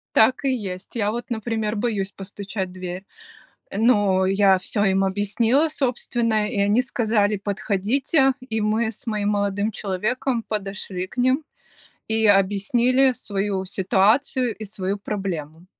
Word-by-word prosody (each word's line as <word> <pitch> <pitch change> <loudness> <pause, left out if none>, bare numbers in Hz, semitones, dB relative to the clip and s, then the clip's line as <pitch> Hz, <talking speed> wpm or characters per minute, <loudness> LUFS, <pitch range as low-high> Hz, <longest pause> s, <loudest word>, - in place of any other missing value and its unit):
Так 255 +5 +4
и - - +3
есть. 195 -5 -6
Я 210 -3 +1
вот, 240 +2 -5
например, 220 -2 -2
боюсь 205 -3 -1
постучать 195 0 -6
в - - -13
дверь. 185 +1 -6 0.6
Э, - - -6
но 205 -5 +3
я 195 0 +4
всё 205 +3 -1
им 195 -1 +2
объяснила, 225 +9 +2
собственно. 235 -6 0
И 205 - -2
они 205 +5 +3
сказали: 215 -4 +1
"Подходите", 215 - +1 0.2
и 220 0 -1
мы 220 +2 +1
с 225 - -12
моим 210 -2 0
молодым 205 +1 0
человеком 225 +5 -2
подошли 195 -3 -4
к 200 - -17
ним, 255 +4 +2 0.6
и 220 0 +1
объяснили 235 +7 +3
свою 200 -5 -3
ситуацию 220 +7 +1
и 215 - -7
свою 195 -1 -3
проблему. 175 -6 -5
210 Hz, 140 wpm, -23 LUFS, 195-235 Hz, 0.6 s, Так